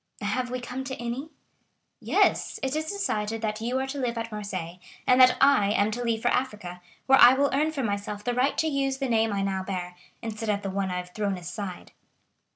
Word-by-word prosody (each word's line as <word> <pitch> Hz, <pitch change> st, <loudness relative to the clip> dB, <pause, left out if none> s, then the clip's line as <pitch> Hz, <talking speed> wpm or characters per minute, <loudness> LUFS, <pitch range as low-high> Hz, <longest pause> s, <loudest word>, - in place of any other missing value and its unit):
"Have 250 Hz, +5 st, -1 dB
we 255 Hz, +1 st, -3 dB
come 250 Hz, +1 st, -5 dB
to 265 Hz, 0 st, -4 dB
any?" 240 Hz, +6 st, -4 dB, 0.7 s
"Yes; -, -, +1 dB
it 265 Hz, +2 st, -1 dB
is 310 Hz, 0 st, -1 dB
decided 225 Hz, -, -2 dB
that 215 Hz, 0 st, -2 dB
you 245 Hz, +3 st, -1 dB
are 265 Hz, -, -1 dB
to 275 Hz, +1 st, -5 dB
live 240 Hz, -2 st, -1 dB
at 230 Hz, 0 st, -4 dB
Marseilles, 185 Hz, -5 st, -5 dB, 0.3 s
and 255 Hz, +1 st, +5 dB
that 255 Hz, 0 st, +7 dB
I 270 Hz, -7 st, +5 dB
am 205 Hz, +1 st, +2 dB
to 240 Hz, +3 st, -3 dB
leave 230 Hz, -2 st, -1 dB
for 245 Hz, -, +3 dB
Africa, 210 Hz, -10 st, -2 dB, 0.2 s
where 270 Hz, 0 st, +6 dB
I 245 Hz, +2 st, +9 dB
will 280 Hz, +1 st, +2 dB
earn 300 Hz, +3 st, +2 dB
for 280 Hz, -4 st, -3 dB
myself 205 Hz, -1 st, -3 dB
the 245 Hz, -, -1 dB
right 255 Hz, +4 st, +1 dB
to 320 Hz, -, +2 dB
use 275 Hz, -2 st, 0 dB
the 270 Hz, -1 st, -2 dB
name 225 Hz, -2 st, +2 dB
I 200 Hz, -1 st, -1 dB
now 190 Hz, -1 st, -1 dB
bear, 180 Hz, -2 st, -5 dB, 0.3 s
instead 225 Hz, -1 st, -4 dB
of 205 Hz, -1 st, 0 dB
the 195 Hz, -, -3 dB
one 195 Hz, 0 st, -1 dB
I 180 Hz, -, -2 dB
have 180 Hz, 0 st, -7 dB
thrown 200 Hz, -3 st, -1 dB
aside." 180 Hz, +1 st, -7 dB
225 Hz, 225 wpm, -27 LUFS, 200-265 Hz, 0.7 s, I